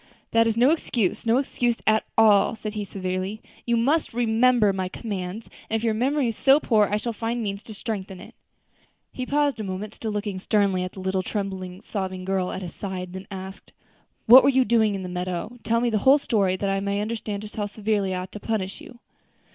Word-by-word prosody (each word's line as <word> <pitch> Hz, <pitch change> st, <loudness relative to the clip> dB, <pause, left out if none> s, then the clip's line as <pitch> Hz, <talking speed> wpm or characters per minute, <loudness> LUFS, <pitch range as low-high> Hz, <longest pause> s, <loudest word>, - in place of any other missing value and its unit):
"That 230 Hz, 0 st, +4 dB
is 225 Hz, 0 st, 0 dB
no 250 Hz, +5 st, +5 dB
excuse, 235 Hz, -, -1 dB
no 230 Hz, +2 st, +4 dB
excuse 245 Hz, -3 st, 0 dB
at 220 Hz, 0 st, +3 dB
all," 220 Hz, 0 st, +5 dB
said 215 Hz, -1 st, -6 dB
he 210 Hz, -1 st, -3 dB
severely; 185 Hz, +2 st, -4 dB, 0.3 s
"You 235 Hz, 0 st, +2 dB
must 275 Hz, +3 st, +1 dB
remember 235 Hz, -2 st, +3 dB
my 185 Hz, -1 st, -2 dB
commands; 200 Hz, 0 st, -5 dB, 0.2 s
and 225 Hz, -, 0 dB
if 225 Hz, -, -1 dB
your 225 Hz, -2 st, +2 dB
memory 260 Hz, +3 st, +1 dB
is 225 Hz, -, -4 dB
so 275 Hz, +5 st, +5 dB
poor 215 Hz, -7 st, +3 dB
I 210 Hz, -, +1 dB
shall 235 Hz, +2 st, -3 dB
find 230 Hz, +2 st, -2 dB
means 200 Hz, -1 st, -3 dB
to 220 Hz, -, -10 dB
strengthen 195 Hz, -4 st, -5 dB
it." -, -, -12 dB, 0.8 s
He 255 Hz, -1 st, -5 dB
paused 285 Hz, -3 st, +1 dB
a -, -, -3 dB
moment, 195 Hz, +2 st, -5 dB
still 225 Hz, -, -5 dB
looking 205 Hz, -2 st, -3 dB
sternly 195 Hz, -1 st, +1 dB
at 185 Hz, -, -5 dB
the 190 Hz, -, -8 dB
little, 190 Hz, 0 st, 0 dB
trembling, 190 Hz, -2 st, -4 dB
sobbing 190 Hz, -3 st, -4 dB
girl 190 Hz, -1 st, -1 dB
at 190 Hz, -, -5 dB
his 175 Hz, -, -7 dB
side; 185 Hz, -2 st, -6 dB
then 190 Hz, +1 st, -8 dB
asked, 190 Hz, 0 st, -9 dB, 0.5 s
"What 250 Hz, +4 st, +10 dB
were 275 Hz, -, +5 dB
you 260 Hz, -1 st, +3 dB
doing 220 Hz, -4 st, +3 dB
in 190 Hz, -, -5 dB
the -, -, -5 dB
meadow? 180 Hz, +6 st, -4 dB
tell 230 Hz, 0 st, +1 dB
me 240 Hz, 0 st, +1 dB
the 215 Hz, -, +1 dB
whole 265 Hz, +6 st, +6 dB
story, 200 Hz, -9 st, +1 dB
that 200 Hz, +2 st, -2 dB
I 195 Hz, 0 st, +1 dB
may 200 Hz, +1 st, -1 dB
understand 210 Hz, -1 st, -3 dB
just 210 Hz, -, -9 dB
how 205 Hz, -1 st, -1 dB
severely 205 Hz, -2 st, -1 dB
I 180 Hz, -, -2 dB
ought 185 Hz, -, -8 dB
to 210 Hz, -, -8 dB
punish 200 Hz, -3 st, -3 dB
you." 245 Hz, -, -12 dB
210 Hz, 220 wpm, -24 LUFS, 190-230 Hz, 0.8 s, What